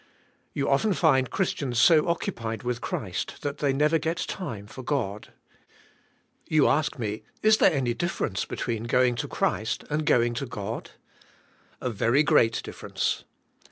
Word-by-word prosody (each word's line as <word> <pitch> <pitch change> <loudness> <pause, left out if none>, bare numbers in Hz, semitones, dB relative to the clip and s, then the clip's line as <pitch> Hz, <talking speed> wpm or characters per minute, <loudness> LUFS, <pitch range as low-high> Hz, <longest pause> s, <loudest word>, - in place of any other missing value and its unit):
You 140 - 0
often 190 +10 +2
find 130 -3 +3
Christians 140 - -1
so 155 +8 +6
occupied 115 -10 -2
with 125 0 -2
Christ 95 -5 -4
that 145 0 -3
they 140 -2 +2
never 150 +4 +2
get 160 +3 -2
time 115 - -5
for 120 +5 -10
God. 120 -7 -3 1.2
You 155 -2 +4
ask 150 -1 +1
me, 110 -3 -3 0.2
is 215 0 +6
there - - +6
any 130 -6 0
difference 120 - -2
between 115 -1 -3
going 125 +1 +3
to - - -2
Christ - - -1
and 155 +1 0
going 120 -6 +3
to 130 +3 -4
God? 105 -1 -5 0.9
A 125 - -2
very 115 +7 +3
great 115 -6 +3
difference. - - -3
130 Hz, 150 wpm, -26 LUFS, 115-150 Hz, 1.2 s, so